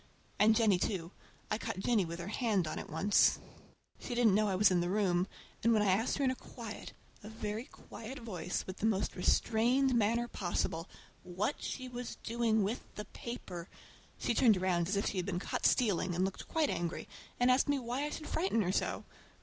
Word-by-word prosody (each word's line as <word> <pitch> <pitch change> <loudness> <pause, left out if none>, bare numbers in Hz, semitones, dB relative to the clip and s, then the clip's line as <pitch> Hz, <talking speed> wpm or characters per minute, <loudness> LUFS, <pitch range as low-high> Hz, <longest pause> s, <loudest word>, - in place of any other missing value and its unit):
And 220 +1 +6
Jennie 215 -6 +4
too. 175 -3 -2 0.4
I 215 - +1
caught 225 -4 -4
Jennie 205 0 +2
with 170 0 -5
her 175 +3 -5
hand 210 -7 +1
on - - -3
it - - -8
once. 195 +7 +4 0.6
She 245 - -5
didn't 235 -4 +4
know 210 +1 +3
I 195 - 0
was 195 +1 +5
in 180 -1 +3
the 175 - -1
room, 185 -2 +2 0.4
and 230 +1 +5
when 215 -2 +3
I 200 - +3
asked 220 +6 +1
her 280 - 0
in 260 - +3
a - - -3
quiet, 230 -4 -9 0.3
a 210 - -9
very 220 +1 -4
quiet 245 +1 -10
voice, 185 - -4
with 185 - -7
the 220 - +1
most 205 -3 0
restrained 240 +8 +2
manner 235 +1 +2
possible, 175 -4 -2 0.3
what 185 +8 -2
she 260 -1 -4
was 245 -1 -6
doing 225 -2 +1
with 215 +6 -1
the 210 - -5
paper 185 -8 -7 0.5
she - - 0
turned 225 -3 +5
around 180 -2 +1
as 195 - 0
if 200 - 0
she 200 - -5
had 180 - 0
been 185 -3 -1
caught 180 - 0
stealing, 195 -7 +2
and 185 +2 +2
looked 190 - -5
quite 320 -2 +1
angry—asked 245 - 0
me 285 - +3
why 250 +2 -2
I - - -2
should 305 - -6
frighten 320 - +1
her 180 - 0
so! - - -1
210 Hz, 205 wpm, -33 LUFS, 185-235 Hz, 0.6 s, And